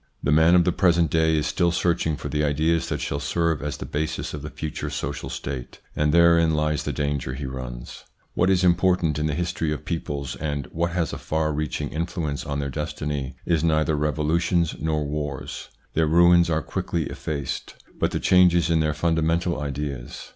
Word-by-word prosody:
The 70 - +1
man 80 +3 +6
of 90 - +6
the 90 - +2
present 85 -4 +3
day 80 -1 +3
is 75 - 0
still 85 -1 +1
searching 85 -2 +1
for - - -6
the 75 0 -1
ideas 80 +3 +1
that - - -2
shall 70 - -2
serve 80 +1 0
as 75 -1 -3
the - - -6
basis 75 +1 -3
of 75 - -5
the 75 - -6
future 75 -1 -5
social - - -4
state, 65 -3 -6 0.2
and 75 0 +2
therein 85 -1 +5
lies 75 -1 0
the - - -1
danger 70 -3 -2
he 70 +1 -5
runs. 65 -2 -7 0.3
What 90 - +2
is 95 -1 +3
important 90 -3 +3
in 75 - 0
the 75 - -1
history 85 -2 -1
of 75 - -4
peoples, 70 -6 -3
and 70 -1 -3
what 85 +1 0
has 85 -4 -1
a - - -5
far 80 0 -1
reaching 75 0 -2
influence 80 -3 -3
on 70 -1 -2
their 70 -1 -3
destiny, 75 -2 -4
is 85 -3 +1
neither 80 -1 +2
revolutions 80 +3 +1
nor 75 -2 -1
wars 75 -2 -5 0.2
their 80 0 +2
ruins 85 +1 +5
are 80 -1 0
quickly 85 -2 -2
effaced 70 -1 -4 0.2
but - - +2
the - - -2
changes 90 -2 +4
in 80 - +3
their 75 -1 +1
fundamental 85 +1 +1
ideas. 70 -3 -5
75 Hz, 190 wpm, -24 LUFS, 75-85 Hz, 0.3 s, man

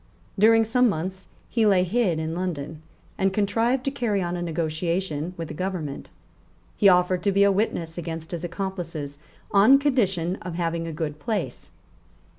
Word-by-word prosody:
During 225 +2 +6
some 250 +2 +3
months, 185 +2 -4 0.2
he 225 -2 +2
lay 190 -3 +4
hid 185 -2 +1
in 160 0 -3
London, 160 -4 -4 0.4
and 195 0 +2
contrived 225 +6 +1
to 275 - 0
carry 235 -7 0
on 175 -1 -2
a 175 - -4
negotiation 165 0 -2
with 165 -1 -4
the - - -5
government. 175 -5 -4 0.7
He 200 - +6
offered 180 0 +3
to 200 - +2
be 200 +1 +4
a 200 - +5
witness 175 -5 -1
against 165 -1 -6
his 170 -1 -4
accomplices 175 -6 -5 0.3
on 215 +7 +7
condition 195 - +1
of 175 -2 -7
having 165 -1 -2
a - - -4
good 150 -1 -4
place. 215 +7 -3
180 Hz, 165 wpm, -25 LUFS, 165-205 Hz, 0.7 s, on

